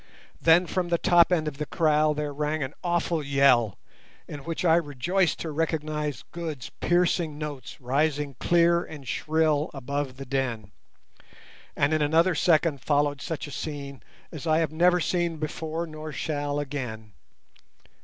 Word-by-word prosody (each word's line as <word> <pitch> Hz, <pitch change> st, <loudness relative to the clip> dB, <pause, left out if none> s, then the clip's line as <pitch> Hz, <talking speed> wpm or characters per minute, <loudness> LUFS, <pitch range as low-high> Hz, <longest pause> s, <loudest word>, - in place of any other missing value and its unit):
Then 165 Hz, +2 st, +5 dB
from 180 Hz, 0 st, -2 dB
the 170 Hz, -, +2 dB
top 175 Hz, -1 st, +4 dB
end 160 Hz, -3 st, +1 dB
of 145 Hz, -1 st, -5 dB
the 150 Hz, -, -3 dB
kraal 155 Hz, -2 st, +2 dB
there 150 Hz, -1 st, -3 dB
rang 150 Hz, +1 st, -1 dB
an 130 Hz, -, -5 dB
awful 175 Hz, -2 st, 0 dB
yell, 135 Hz, -6 st, +3 dB, 0.5 s
in 145 Hz, -, -7 dB
which 165 Hz, +5 st, -4 dB
I 165 Hz, -1 st, +6 dB
rejoiced 170 Hz, +4 st, 0 dB
to 160 Hz, -, -4 dB
recognize 150 Hz, -2 st, -2 dB
Good's 160 Hz, -7 st, -6 dB
piercing 175 Hz, -3 st, +1 dB
notes 150 Hz, -3 st, -7 dB
rising 145 Hz, +2 st, 0 dB
clear 170 Hz, 0 st, +3 dB
and 145 Hz, -4 st, -10 dB
shrill 155 Hz, 0 st, +1 dB
above 135 Hz, 0 st, -3 dB
the 135 Hz, -, -7 dB
din, 125 Hz, -6 st, -2 dB, 1.0 s
and 140 Hz, +2 st, +2 dB
in 155 Hz, -, +2 dB
another 165 Hz, +5 st, +3 dB
second 160 Hz, -4 st, +2 dB
followed 145 Hz, +1 st, +1 dB
such 160 Hz, -, -4 dB
a 145 Hz, -, -9 dB
scene 140 Hz, -2 st, -6 dB, 0.3 s
as 160 Hz, -1 st, -7 dB
I 155 Hz, 0 st, +4 dB
have 160 Hz, -2 st, +1 dB
never 175 Hz, +3 st, +3 dB
seen 175 Hz, -1 st, 0 dB
before 160 Hz, +2 st, -3 dB
nor 155 Hz, -1 st, -8 dB
shall 145 Hz, -2 st, -2 dB
again. 125 Hz, -7 st, -5 dB
150 Hz, 155 wpm, -26 LUFS, 140-165 Hz, 1.0 s, I